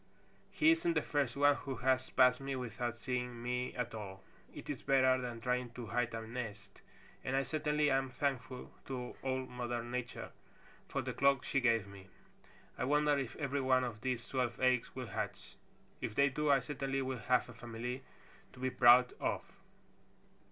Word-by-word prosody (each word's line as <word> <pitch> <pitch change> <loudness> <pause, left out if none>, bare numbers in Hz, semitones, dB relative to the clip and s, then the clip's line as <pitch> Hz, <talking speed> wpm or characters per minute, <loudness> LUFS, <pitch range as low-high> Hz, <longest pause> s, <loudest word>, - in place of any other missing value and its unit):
He 315 +1 +4
isn't 335 0 +2
the - - +2
first 140 -5 0
one 145 0 +5
who 135 -2 -5
has 130 +1 +1
passed 125 0 +5
me 135 0 -3
without 120 -1 -3
seeing 125 -1 -3
me 125 +1 -2
at 120 -1 -3
all. 95 -3 -7 0.3
It - - -10
is - - -4
better 130 -2 +4
than 120 -2 -5
trying 125 0 0
to 120 -1 -6
hide 120 0 -1
a 115 0 -4
nest, 110 -3 -7 0.4
and 130 - -1
I 135 - +3
certainly 150 +1 +1
am 135 0 +2
thankful 130 -1 -3
to 125 -2 -5
Old 130 -1 -2
Mother 120 -1 -3
Nature 120 0 -5 0.6
for - - -2
the - - -3
cloak 140 -2 +3
she 135 - +1
gave 115 -4 +3
me. 100 -1 -12 0.7
I - - 0
wonder 150 +2 +3
if 130 -4 -4
every 140 -1 -1
one 130 -1 +3
of 115 -4 -4
these 130 -1 -2
twelve 125 -3 -1
eggs 130 -2 +2
will 130 -1 -4
hatch. - - -5 0.5
If 115 -4 -3
they 140 0 +5
do, 150 +2 -1
I 135 -2 +5
certainly 135 0 -2
will 130 -1 -3
have 125 +3 +2
a 125 - -10
family 120 +2 -5 0.5
to 125 - -14
be 130 0 -1
proud 125 0 +7
of." - - -1
125 Hz, 180 wpm, -35 LUFS, 120-135 Hz, 0.7 s, proud